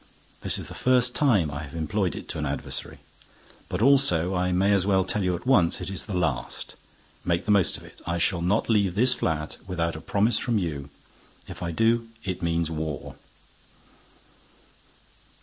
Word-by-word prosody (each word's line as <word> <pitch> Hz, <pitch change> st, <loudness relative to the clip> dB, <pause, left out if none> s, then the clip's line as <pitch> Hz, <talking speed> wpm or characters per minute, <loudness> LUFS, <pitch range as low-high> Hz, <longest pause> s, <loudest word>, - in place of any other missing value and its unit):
This -, -, 0 dB
is -, -, -5 dB
the -, -, -9 dB
first 125 Hz, -1 st, +2 dB
time 105 Hz, -, +2 dB
I 75 Hz, +1 st, -5 dB
have 75 Hz, 0 st, -9 dB
employed 85 Hz, +2 st, -1 dB
it -, -, -8 dB
to -, -, -4 dB
an -, -, -2 dB
adversary. -, -, -4 dB, 0.7 s
But -, -, -1 dB
also, 105 Hz, -, +4 dB
I 90 Hz, 0 st, 0 dB
may 95 Hz, +3 st, +3 dB
as 100 Hz, -2 st, +4 dB
well 95 Hz, -2 st, +2 dB
tell 105 Hz, +1 st, 0 dB
you 90 Hz, -1 st, +1 dB
at 85 Hz, -, -9 dB
once, 100 Hz, -11 st, +3 dB
it -, -, -5 dB
is 95 Hz, -, -3 dB
the 100 Hz, -4 st, -2 dB
last. 70 Hz, -8 st, -2 dB, 0.5 s
Make 85 Hz, -1 st, 0 dB
the 105 Hz, -, +1 dB
most 100 Hz, -4 st, +3 dB
of -, -, -13 dB
it. -, -, -15 dB
I 85 Hz, 0 st, 0 dB
shall 85 Hz, 0 st, +1 dB
not 95 Hz, +6 st, +1 dB
leave 100 Hz, -5 st, +2 dB
this 125 Hz, +4 st, +5 dB
flat 75 Hz, -7 st, -2 dB
without 85 Hz, -3 st, -2 dB
a 80 Hz, -, -7 dB
promise 105 Hz, +6 st, +2 dB
from 120 Hz, -3 st, 0 dB
you. 75 Hz, -7 st, -3 dB, 0.6 s
If -, -, -8 dB
I 85 Hz, -, -2 dB
do, 115 Hz, +6 st, +1 dB, 0.2 s
it 95 Hz, -1 st, -4 dB
means 85 Hz, -1 st, 0 dB
war." 80 Hz, -2 st, -4 dB
90 Hz, 185 wpm, -26 LUFS, 85-105 Hz, 0.7 s, this